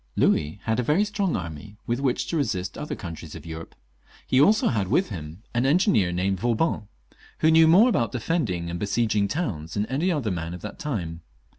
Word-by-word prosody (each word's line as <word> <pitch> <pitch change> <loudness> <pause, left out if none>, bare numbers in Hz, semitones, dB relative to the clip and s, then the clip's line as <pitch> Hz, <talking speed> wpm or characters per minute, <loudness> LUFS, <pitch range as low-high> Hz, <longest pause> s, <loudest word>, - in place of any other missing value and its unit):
Louis 75 +5 +1
had 110 +1 0
a - - +3
very 150 - +2
strong 200 -4 -1
army 85 +4 -6
with 120 +2 -1
which 135 -3 0
to - - -3
resist 95 -10 -1
the - - -8
other 150 - -4
countries 85 -4 -8
of 80 -1 -10
Europe; 80 0 -8 0.5
he 130 - +3
also 210 +8 +4
had 100 -6 0
with 180 - +2
him 85 0 -8
an 120 0 +1
engineer 150 - +3
named 95 +2 0
Vauban, 115 - 0 0.5
who 160 - +5
knew 160 0 +7
more 190 +9 +7
about 120 - +1
defending 115 - -1
and 85 - -4
besieging 105 0 +1
towns 95 - -3
than 105 - 0
any 150 +10 0
other 140 - -1
man 85 -1 -4
of 90 - -10
that - - -8
time. 90 - -4
110 Hz, 200 wpm, -25 LUFS, -, 0.5 s, knew